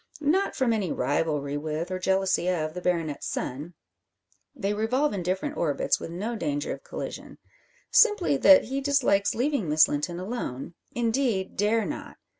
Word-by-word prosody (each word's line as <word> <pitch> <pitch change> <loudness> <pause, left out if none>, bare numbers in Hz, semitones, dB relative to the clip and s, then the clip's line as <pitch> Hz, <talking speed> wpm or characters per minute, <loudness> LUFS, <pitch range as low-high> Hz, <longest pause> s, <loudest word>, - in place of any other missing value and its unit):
Not 320 +7 +1
from 250 -3 +2
any 200 -6 -1
rivalry 145 +1 -1
with, 155 +4 -4
or 185 - -2
jealousy 190 -1 +1
of, 155 -3 -1
the 180 - -6
baronet's 165 -5 -1
son: 150 +7 -4 0.8
they 205 -6 -1
revolve 250 +7 0
in 195 - -3
different 190 - -2
orbits, 150 -4 +1
with - - -6
no 205 +8 -4
danger 145 -8 -2
of - - -10
collision. - - -7 0.5
Simply 415 -9 +4
that 285 +1 +7
he 270 +4 -3
dislikes 270 -8 +2
leaving 245 - 0
Miss 155 +1 +6
Linton 170 +4 -3
alone 180 - -5 0.2
indeed, 235 -5 0
dare 215 +2 +1
not. - - -6
190 Hz, 155 wpm, -26 LUFS, 160-245 Hz, 0.8 s, that